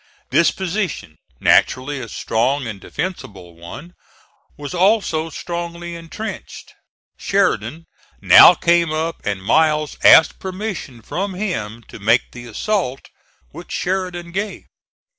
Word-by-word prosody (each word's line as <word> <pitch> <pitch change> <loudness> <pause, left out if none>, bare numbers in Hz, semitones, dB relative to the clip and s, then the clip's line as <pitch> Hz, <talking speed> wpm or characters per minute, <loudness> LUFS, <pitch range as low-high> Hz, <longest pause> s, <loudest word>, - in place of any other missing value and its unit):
This - - +4
position, 185 - -4 0.2
naturally 140 +2 +2
a 115 -3 -7
strong 125 +7 -1
and 105 -4 -7
defensible 100 - -6
one, 90 - -11 0.6
was 145 +1 -7
also 180 -4 +1
strongly 170 +1 -6
intrenched. 170 +7 -8 0.5
Sheridan 165 - 0 0.3
now 175 - +8
came 170 -1 +2
up 160 +1 -3
and 100 -2 -3
Miles 155 +4 +2
asked 160 - +7
permission 185 - -6
from 190 - -4
him 115 - -4
to - - -13
make 115 +4 +2
the 120 -1 -10
assault, 135 - -2 0.4
which - - -11
Sheridan 180 -2 -3
gave. 200 +4 -4
165 Hz, 115 wpm, -19 LUFS, 120-185 Hz, 0.6 s, now